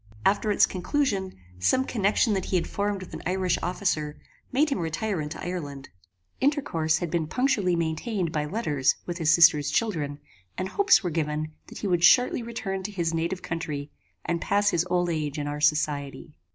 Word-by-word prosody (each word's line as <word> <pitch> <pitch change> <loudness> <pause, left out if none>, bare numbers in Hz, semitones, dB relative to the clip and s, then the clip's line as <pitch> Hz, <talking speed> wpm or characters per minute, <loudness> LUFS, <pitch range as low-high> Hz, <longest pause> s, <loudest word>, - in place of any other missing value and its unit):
After 210 +2 +2
its 205 - +5
conclusion, 195 -1 -1 0.2
some 255 - +2
connection 215 0 +2
that 190 -2 -1
he - - -2
had 175 - +2
formed 200 -1 -2
with 185 - -12
an - - -6
Irish 185 -1 0
officer, 160 -5 -1 0.3
made 290 +3 +2
him 240 - 0
retire 170 +3 -2
into 150 +2 -6
Ireland. 145 -7 -5 0.5
Intercourse 170 - +1
had 175 -2 -4
been 160 -2 0
punctually 210 - +1
maintained 170 +3 -1
by 150 -1 -1
letters 150 - +1
with 175 0 -5
his 160 -2 +3
sister's 160 -4 +6
children, 150 -7 -1 0.4
and 185 +1 -2
hopes 405 - +4
were 175 - -1
given 155 -1 -2 0.2
that - - -10
he 205 - -3
would 175 -2 +1
shortly 245 +8 +5
return 220 -5 -4
to 200 +3 -5
his 170 -4 -1
native 170 +3 -2
country, 150 -3 -4 0.3
and 170 -1 -1
pass 205 0 +2
his 175 +1 +1
old 175 -1 +1
age 155 -2 -2
in 145 - -2
our 145 0 -4
society. 150 -1 0
175 Hz, 180 wpm, -26 LUFS, 155-200 Hz, 0.5 s, sister's